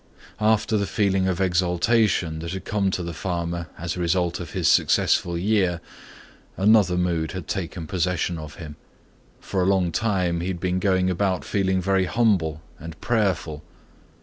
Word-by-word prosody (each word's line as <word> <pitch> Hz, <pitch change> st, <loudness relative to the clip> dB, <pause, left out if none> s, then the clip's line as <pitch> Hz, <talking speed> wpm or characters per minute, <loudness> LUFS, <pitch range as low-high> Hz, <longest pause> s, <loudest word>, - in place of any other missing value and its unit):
After 110 Hz, 0 st, +2 dB
the 100 Hz, -1 st, -1 dB
feeling 95 Hz, -2 st, +1 dB
of 95 Hz, -1 st, -1 dB
exaltation 90 Hz, -1 st, +1 dB
that 85 Hz, +2 st, -5 dB
had 95 Hz, -, -6 dB
come 100 Hz, -3 st, 0 dB
to 90 Hz, -1 st, -2 dB
the 85 Hz, 0 st, -5 dB
farmer 85 Hz, 0 st, -3 dB
as 85 Hz, 0 st, -4 dB
a -, -, -6 dB
result 85 Hz, 0 st, 0 dB
of 85 Hz, -4 st, -6 dB
his -, -, 0 dB
successful 85 Hz, -1 st, +3 dB
year, 95 Hz, -2 st, +1 dB, 0.8 s
another 100 Hz, -2 st, +4 dB
mood 85 Hz, -3 st, -1 dB
had 90 Hz, -4 st, -6 dB
taken 90 Hz, -3 st, -4 dB
possession 90 Hz, 0 st, -1 dB
of 75 Hz, -3 st, -9 dB
him. 75 Hz, 0 st, -9 dB, 0.6 s
For 95 Hz, -, -2 dB
a 90 Hz, -, +1 dB
long 95 Hz, -3 st, +2 dB
time 90 Hz, -5 st, 0 dB
he 90 Hz, -, -3 dB
had 95 Hz, -2 st, -3 dB
been 90 Hz, +1 st, -1 dB
going 95 Hz, -1 st, +2 dB
about 90 Hz, -4 st, -1 dB
feeling 95 Hz, -2 st, 0 dB
very 95 Hz, 0 st, +2 dB
humble 90 Hz, -8 st, +1 dB, 0.2 s
and 80 Hz, +1 st, -9 dB
prayerful. 95 Hz, -10 st, -1 dB
90 Hz, 165 wpm, -24 LUFS, 85-95 Hz, 0.8 s, another